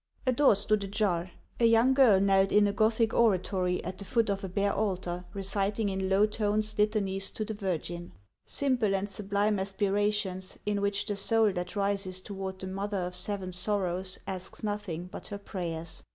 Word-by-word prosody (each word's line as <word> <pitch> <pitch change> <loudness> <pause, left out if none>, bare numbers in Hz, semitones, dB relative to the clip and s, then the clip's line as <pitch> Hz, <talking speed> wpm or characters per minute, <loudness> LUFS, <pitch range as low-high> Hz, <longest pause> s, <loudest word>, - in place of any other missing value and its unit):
A 255 - +3
door 260 -3 +5
stood 205 +1 +1
ajar; 195 -3 0 0.3
a 235 - +4
young 230 +3 +5
girl 250 -8 +6
knelt 195 0 +3
in 210 0 +5
a 200 - +1
Gothic 220 +2 +2
oratory, 185 -4 +2
at 185 +1 -5
the - - -3
foot 225 +1 +1
of 195 +1 -3
a 190 - -4
bare 200 +2 0
altar, 180 -4 -2
reciting 200 +2 +1
in 190 0 -2
low 195 +2 +5
tones 215 0 0
litanies 200 -2 0
to 215 - -4
the 220 - -4
Virgin, 175 -3 -4 0.2
— - - -57
simple 245 -8 +1
and 195 +1 -1
sublime 200 +1 0
aspirations, 195 -1 -1
in 205 -1 0
which 200 0 0
the 205 - -2
soul 220 +1 +3
that 180 +2 -4
rises 195 -2 0
toward 190 -1 -6
the 190 - -7
Mother 200 +2 -3
of 180 -1 -3
Seven 190 0 -2
Sorrows 185 -1 -1
asks 190 +1 -6
nothing 205 -5 -3
but 180 - -9
her 205 - -5
prayers. 170 -5 -5
200 Hz, 180 wpm, -29 LUFS, 190-210 Hz, 0.3 s, girl